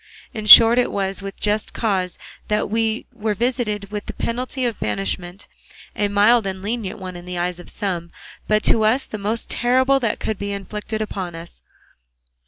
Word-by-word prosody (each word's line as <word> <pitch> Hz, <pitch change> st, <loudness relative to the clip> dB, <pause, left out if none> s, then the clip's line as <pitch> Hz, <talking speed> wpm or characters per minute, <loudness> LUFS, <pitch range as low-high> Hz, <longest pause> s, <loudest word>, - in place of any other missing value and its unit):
In 215 Hz, -2 st, -5 dB
short 230 Hz, +2 st, +10 dB
it 245 Hz, -, +1 dB
was 195 Hz, -1 st, -2 dB
with 195 Hz, 0 st, -8 dB
just 210 Hz, 0 st, -1 dB
cause 190 Hz, -5 st, -1 dB, 0.3 s
that 210 Hz, -1 st, -1 dB
we 225 Hz, 0 st, 0 dB
were 215 Hz, -2 st, -2 dB
visited 215 Hz, -3 st, -2 dB
with 210 Hz, -1 st, -5 dB
the -, -, -6 dB
penalty 250 Hz, +2 st, -2 dB
of 235 Hz, -3 st, -2 dB
banishment, 140 Hz, -, -3 dB, 0.5 s
a 205 Hz, -, +1 dB
mild 205 Hz, +2 st, +4 dB
and 190 Hz, 0 st, -5 dB
lenient 215 Hz, -1 st, -3 dB
one 185 Hz, -1 st, -7 dB
in 175 Hz, 0 st, -9 dB
the 180 Hz, 0 st, -5 dB
eyes 175 Hz, 0 st, -2 dB
of 175 Hz, -, -10 dB
some, 175 Hz, -5 st, -3 dB, 0.4 s
but 215 Hz, 0 st, +2 dB
to 225 Hz, -, +3 dB
us 225 Hz, +6 st, +2 dB
the 215 Hz, -, -7 dB
most 215 Hz, +3 st, -3 dB
terrible 260 Hz, +3 st, +3 dB
that 230 Hz, -5 st, -1 dB
could 215 Hz, -, -3 dB
be 200 Hz, 0 st, -3 dB
inflicted 210 Hz, +2 st, -4 dB
upon 185 Hz, -5 st, -5 dB
us. 165 Hz, +1 st, -10 dB
210 Hz, 185 wpm, -21 LUFS, 190-225 Hz, 0.5 s, short